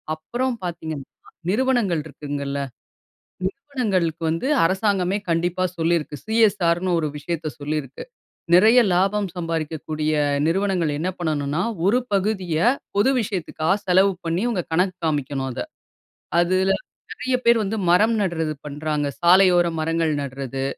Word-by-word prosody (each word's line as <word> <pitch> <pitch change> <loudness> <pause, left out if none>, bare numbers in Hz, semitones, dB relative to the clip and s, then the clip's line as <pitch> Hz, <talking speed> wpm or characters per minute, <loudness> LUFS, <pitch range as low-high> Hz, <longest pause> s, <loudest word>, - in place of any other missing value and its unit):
அப்புறம் 240 +11 -2
பாத்தீங்கன்னா, 160 -5 -5 0.4
நிறுவனங்கள் 230 -8 +1
இருக்குங்கல்ல, 140 -2 -4 0.9
நிறுவனங்களுக்கு 195 - -2
வந்து 165 +10 -2 0.2
அரசாங்கமே 190 +1 +1
கண்டிப்பா 175 +2 0
சொல்லியிருக்கு. 165 -2 0
சிஎஸ்ஆர்ன்னு 185 -5 +2
ஒரு 155 - -1
விஷயத்தை 160 0 -3
சொல்லியிருக்கு. 145 -2 -4 0.5
நிறைய 220 +7 +7
லாபம் 195 +3 +1
சம்பாரிக்கக்கூடிய 155 -2 -2 0.3
நிறுவனங்கள் 185 -2 +1
என்ன 175 +4 -1
பண்ணணுன்னா, 155 -2 -1 0.3
ஒரு 235 +5 +4
பகுதிய 190 -4 0 0.4
பொது 210 +6 +4
விஷயத்துக்காக 185 -3 -1
செலவு 190 +2 +4
பண்ணி, 165 +3 -1
உங்க 185 -7 -1
கணக்கு 180 +2 +1
காமிக்கணும் 140 -3 -1
அத. 125 0 -5 0.8
அதுல 185 +2 +2 0.4
நிறைய 255 0 -1
பேர் 235 0 +6
வந்து 210 +2 -2
மரம் 215 +6 +4
நடுறது 165 -5 -1
பண்றாங்க. 150 0 -2
சாலையோர 180 0 +6
மரங்கள் 165 0 0
நடுறது, 135 -1 -4
175 Hz, 115 wpm, -22 LUFS, 155-195 Hz, 0.9 s, நிறைய